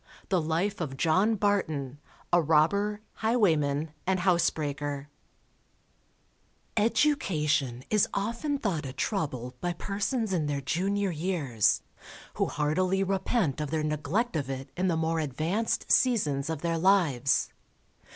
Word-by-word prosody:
The 185 -3 +2
Life 170 +6 -1
of 135 -5 -4
JOHN 185 +10 +3
BARTON, 155 -10 -1 0.3
a 175 - +6
Robber, 200 +7 +2 0.2
Highwayman 160 -10 +1 0.2
and 185 -1 +1
Housebreaker 145 -5 0 1.7
Education 155 - +1
is 210 -2 +4
often 235 +8 -1
thought 195 - -2
a 130 - -7
trouble 135 - -2
by 175 0 -1
persons 205 +4 -2
in 160 -5 0
their 145 -1 -1
junior 195 +7 0
years, 155 - +1 0.5
who - - 0
heartily 185 +6 +1
repent 190 - 0
of 150 - -3
their 155 0 -1
neglect 155 +10 -1
of 140 -4 -2
it 135 0 -5
in 185 +2 0
the 170 -3 +1
more 160 0 0
advanced 160 - -1
seasons 150 - +2
of 160 -1 -4
their 165 -1 0
lives. 160 -9 +3
165 Hz, 125 wpm, -28 LUFS, 145-200 Hz, 1.7 s, a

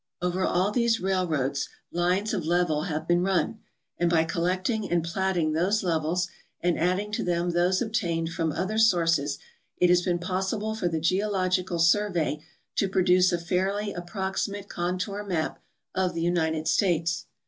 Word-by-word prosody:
Over 180 +1 -1
all 185 +3 +1
these 235 0 +2
railroads 160 -8 0 0.2
lines 180 +5 0
of 175 - -1
level 170 -3 +1
have 155 -2 -3
been 175 0 +3
run, 195 +4 0 0.4
and 175 0 +2
by 165 -1 +4
collecting 185 +6 -1
and 175 -1 +1
platting 175 -2 0
those 190 +7 +1
levels 170 +1 0 0.3
and 175 -1 0
adding 185 +5 0
to 210 - -1
them 175 0 0
those 180 +4 +2
obtained 170 -7 -1
fr^m 165 -1 -1
other 210 +4 -1
sources, 165 -9 +3 0.4
it 180 -1 +4
has 180 0 +5
been 180 -1 0
possible 190 +4 -2
for 220 -5 -1
the 165 -2 -1
Geological 185 0 0
Survey 170 -3 +2 0.4
to 195 - +2
produce 185 -1 +4
a 175 - +1
fairly 190 +4 -1
approximate 190 +3 -3
contour 180 +4 -2
map 175 -6 -2 0.3
of 185 -2 0
the 165 - -2
United 160 -2 0
States. 170 -3 +1
180 Hz, 155 wpm, -27 LUFS, 170-190 Hz, 0.4 s, has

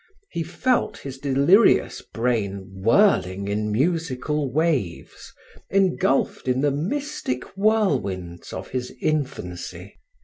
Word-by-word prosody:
He 170 - -2
felt 210 +5 0
his 135 -1 -8
delirious 140 - +4
brain 100 -5 -2
whirling 100 - +3
in 105 +1 -1
musical 150 +1 0
waves, 145 - -1 0.4
engulfed 185 -10 +1
in 130 +1 +1
the 145 0 +2
mystic 175 - -2
whirlwinds 135 - 0
of - - -6
his 125 -1 -3
infancy. 130 - -3
135 Hz, 100 wpm, -23 LUFS, 105-175 Hz, 0.4 s, delirious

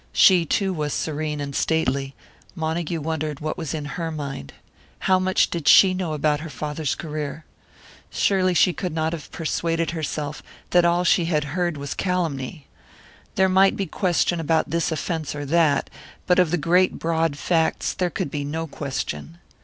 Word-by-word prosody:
She, 175 -3 +6
too, 195 +3 +1
was 150 -4 -2
serene 150 -1 -2
and 140 -1 -5
stately; 140 -4 0 0.4
Montague 160 0 -2
wondered 155 -1 -3
what 155 +1 -3
was 160 -3 -4
in 150 -2 -4
her 165 +2 -4
mind. 140 - -6 0.5
How 185 -1 +3
much 185 0 +2
did 170 -4 -3
she 190 -2 +8
know 180 -4 -2
about 150 0 +1
her 160 +1 -7
father's 150 -1 -3
career? 155 -1 -5 0.6
Surely 185 -2 +2
she 175 +3 +4
could 180 -3 -4
not 160 0 0
have 160 -3 -7
persuaded 165 0 -1
herself 150 -2 -4 0.3
that 175 -1 +5
all 170 +1 +3
that - - -5
she 175 - +4
had 155 -3 +1
heard 175 -3 -1
was 140 0 -4
calumny. 160 -6 -2 0.7
There 190 - +4
might 190 +1 +4
be 195 - -1
question 175 0 0
about 160 0 +1
this 170 0 0
offence 160 -1 -3
or 145 0 -4
that, 155 -1 +2 0.4
but 180 0 +3
of 180 -3 +4
the 175 - +1
great 180 +4 +2
broad 165 -2 0
facts 165 +1 0
there 180 -1 -1
could 145 - -3
be 145 -1 -3
no 160 +3 -3
question. 140 - -5
160 Hz, 175 wpm, -23 LUFS, 150-175 Hz, 0.7 s, she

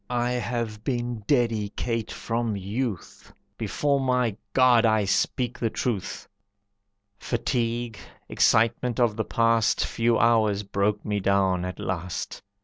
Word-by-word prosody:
I 120 0 0
have 115 -3 -3
been 120 -3 -2
dedicate 115 -2 0
from 115 -2 -2
youth. 100 +1 -5 0.2
Before 140 -1 0
my 125 -5 +1 0.2
God 125 -3 +5
I 110 -2 +3
speak 120 +5 0
the 115 - 0
truth!" 110 -4 -3 0.9
Fatigue, 120 -2 -2 0.3
excitement 115 +2 +2
of 120 -3 +3
the 110 - -1
past 115 -1 +2
Few 115 0 +1
hours 110 -3 +3
broke 100 +1 -1
me 105 -1 -1
down 95 -2 +2
at 90 - -5
last. 90 -1 -4
115 Hz, 120 wpm, -25 LUFS, 105-120 Hz, 0.9 s, God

